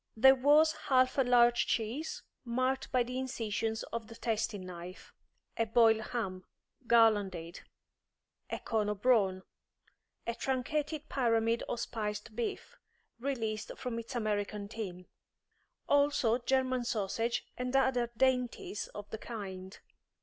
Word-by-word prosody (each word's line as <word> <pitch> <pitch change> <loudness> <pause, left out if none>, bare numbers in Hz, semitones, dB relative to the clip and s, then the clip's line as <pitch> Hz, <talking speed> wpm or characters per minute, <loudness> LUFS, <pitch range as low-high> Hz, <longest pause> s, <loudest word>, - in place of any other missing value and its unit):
There 265 +4 +8
was 295 +4 +5 0.2
half 255 0 +3
a - - +6
large 240 -1 +4
cheese, 240 +8 -2 0.2
marked 255 +2 -1
by 255 -2 +3
the 250 +2 -4
incisions 225 -3 -2
of 230 -2 -3
the 230 - -11
tasting 220 -4 -2
knife; 180 +1 -9 0.4
a 230 - +1
boiled 225 -1 +5
ham, 190 -6 -3 0.4
garlanded; 200 -8 +3 0.9
a - - -2
cone 215 -2 -1
of 210 -1 -4
brawn; 195 -7 +3 0.8
a 235 - -1
truncated 295 +5 -2
pyramid 230 -3 +1
of 235 - -2
spiced 215 0 -4
beef, 235 0 -4 0.4
released 225 -5 -3
from 235 -2 -3
its 230 +3 -8
American 210 -2 -2
tin; 190 -4 -6 0.8
also 285 -5 +3
German 255 0 +1
sausage 225 +1 -1
and 250 +1 -3
other 255 -3 +2
dainties 250 -4 0
of 205 0 -7
the 220 - -5
kind. 190 -5 -7
230 Hz, 125 wpm, -32 LUFS, 210-255 Hz, 0.9 s, There